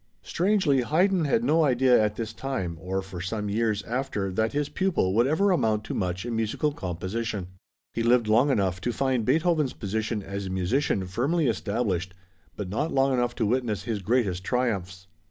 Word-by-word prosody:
Strangely, 180 -8 +2
Haydn 175 +6 +2
had 225 +11 +1
no 165 -7 +3
idea 125 -4 +4
at 105 0 0
this 110 -1 -4
time 110 -11 -3
or 95 +2 -2
for 95 -2 -8
some 105 +3 -3
years 110 -1 0
after 115 -5 -2
that 110 +4 0
his 145 0 -1
pupil 155 - 0
would 120 +4 +3
ever 195 +7 +2
amount 110 -11 +1
to - - -5
much 90 +1 -2
in 120 -1 -3
musical 115 +7 0
composition. 95 - -4 0.4
He 115 - -2
lived 120 -1 +3
long 115 +7 +4
enough 95 -8 0
to 120 - -1
find 130 -2 0
Beethoven's 155 0 +2
position 110 +1 -3
as 100 0 -5
a - - -4
musician 95 +3 0
firmly 140 - 0
established, 100 -5 -1 0.4
but 105 - -5
not 145 - -2
long 135 0 +2
enough 120 -1 0
to 115 - 0
witness 115 -2 0
his 110 -4 -3
greatest 100 -4 0
triumphs. 95 -6 -2
115 Hz, 180 wpm, -26 LUFS, 100-135 Hz, 0.4 s, idea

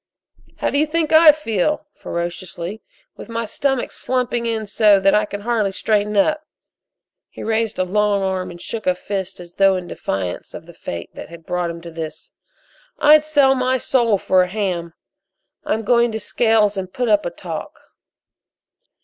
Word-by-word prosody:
"How - - -1
do 285 - +1
you 305 - +2
think 320 0 0
I 315 0 +9
feel," 295 - -1
ferociously, 175 +3 -5 0.4
"with - - -10
my 230 0 -3
stomach 270 +3 -1
slumping 245 -2 -1
in 220 -1 -2
so 205 -1 +4
I 195 +2 +3
can 205 0 -7
hardly 220 -3 0
straighten 210 +1 0
up?" 305 +9 +2 0.9
He - - -9
raised 225 0 -1
a 185 - +2
long 200 +1 +1
arm 185 -1 -2
and 175 -1 -10
shook 220 +4 -5
a 180 - +3
fist 190 0 -5
as 175 -1 -11
though 195 -1 +4
in 180 -1 -5
defiance 95 - -4
of - - -9
the - - -14
Fate 85 0 -7
that - - -9
had 165 -1 -12
brought 180 -1 -1
him 170 0 -7
to 170 0 -9
this. 160 -1 -7 0.7
"I'd 300 +1 +6
sell 285 -3 +4
my 255 0 +1
soul 235 -4 +2
for 185 0 +3
a 180 - +1
ham! 180 -5 -3 0.7
I'm 220 +1 -1
going 235 +1 +3
to 220 - -2
Scales 215 -1 +2
and 185 -1 -4
put 245 +3 -2
up 210 -2 +3
a - - -2
talk." 170 -2 -7
210 Hz, 175 wpm, -20 LUFS, 185-235 Hz, 0.9 s, I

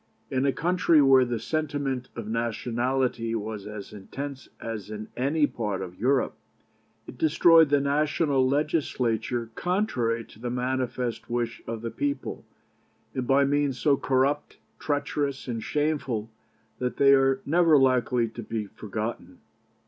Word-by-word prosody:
In 130 +1 +1
a - - +4
country 170 +1 +3
where 135 -2 +6
the 120 -1 -2
sentiment 140 -4 -2
of 115 -3 -6
nationality 120 +1 -1
was 110 -2 -5
as 105 -1 -8
intense 135 +7 -7
as 110 -3 -6
in 105 0 -7
any 145 +4 +2
part 105 -8 -3
of 90 -1 -9
Europe, 130 +4 +2 0.7
it - - -11
destroyed 160 0 +6
the 145 0 +4
national 140 -1 +2
Legislature 125 -6 0
contrary 125 - 0
to - - -17
the 120 +1 -4
manifest 125 -1 -2
wish 120 -1 -2
of 115 -1 -5
the 115 - -3
people, 140 -2 -3 0.7
and 130 -2 -3
by 140 +1 +4
means 140 -2 +1
so 145 0 +3
corrupt, 135 +2 0 0.2
treacherous, 145 -1 -2
and 115 -2 -3
shameful 140 -7 -1 0.5
that 125 -1 -2
they 140 0 +6
are 135 -1 +4
never 165 0 +5
likely 125 -2 +3
to 115 - -8
be 110 -1 -3
forgotten. 110 +3 -6
130 Hz, 140 wpm, -26 LUFS, 115-145 Hz, 0.7 s, where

